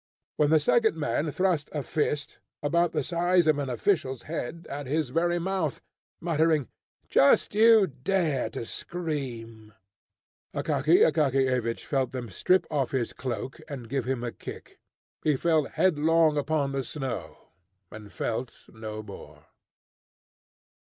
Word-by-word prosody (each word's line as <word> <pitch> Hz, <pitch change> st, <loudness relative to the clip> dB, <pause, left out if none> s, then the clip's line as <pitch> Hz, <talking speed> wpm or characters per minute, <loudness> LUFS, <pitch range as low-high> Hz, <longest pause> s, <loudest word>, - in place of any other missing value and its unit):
when 150 Hz, -1 st, +2 dB
the 160 Hz, 0 st, +5 dB
second 220 Hz, +4 st, +2 dB
man 145 Hz, +1 st, -1 dB
thrust 175 Hz, -2 st, 0 dB
a 150 Hz, -2 st, -2 dB
fist, 150 Hz, 0 st, -2 dB, 0.2 s
about 170 Hz, +3 st, +2 dB
the 150 Hz, -3 st, -1 dB
size 175 Hz, +2 st, +2 dB
of 155 Hz, -2 st, +3 dB
an 140 Hz, -2 st, -2 dB
official's 130 Hz, -, 0 dB
head, 165 Hz, +1 st, -5 dB
at 145 Hz, -1 st, -6 dB
his 150 Hz, -1 st, -1 dB
very 175 Hz, +3 st, +1 dB
mouth, 175 Hz, -4 st, -1 dB, 0.4 s
muttering, 160 Hz, -4 st, +1 dB, 0.4 s
"Just 140 Hz, -, +4 dB
you 220 Hz, -1 st, +6 dB
dare 145 Hz, -, -1 dB
to 115 Hz, -, -6 dB
scream!" 120 Hz, -11 st, -5 dB, 0.8 s
Akaky 155 Hz, +3 st, +3 dB
Akakiyevich 130 Hz, -6 st, +1 dB
felt 135 Hz, -3 st, -1 dB
them 120 Hz, -5 st, -5 dB
strip 185 Hz, -, +2 dB
off 140 Hz, -4 st, 0 dB
his 130 Hz, -4 st, -2 dB
cloak, 130 Hz, 0 st, -5 dB
and 130 Hz, -5 st, -7 dB
give 135 Hz, -2 st, -1 dB
him 130 Hz, -2 st, -2 dB
a 120 Hz, -, -2 dB
kick. -, -, -10 dB, 0.4 s
He 150 Hz, -2 st, +2 dB
fell 160 Hz, +1 st, +2 dB
headlong 160 Hz, -1 st, +3 dB
upon 145 Hz, -1 st, 0 dB
the 135 Hz, -1 st, -2 dB
snow, 135 Hz, -2 st, -6 dB, 0.4 s
and 105 Hz, -1 st, -10 dB
felt 115 Hz, +6 st, -4 dB
no 110 Hz, -1 st, -7 dB
more. 100 Hz, -2 st, -12 dB
145 Hz, 135 wpm, -27 LUFS, 130-165 Hz, 0.8 s, you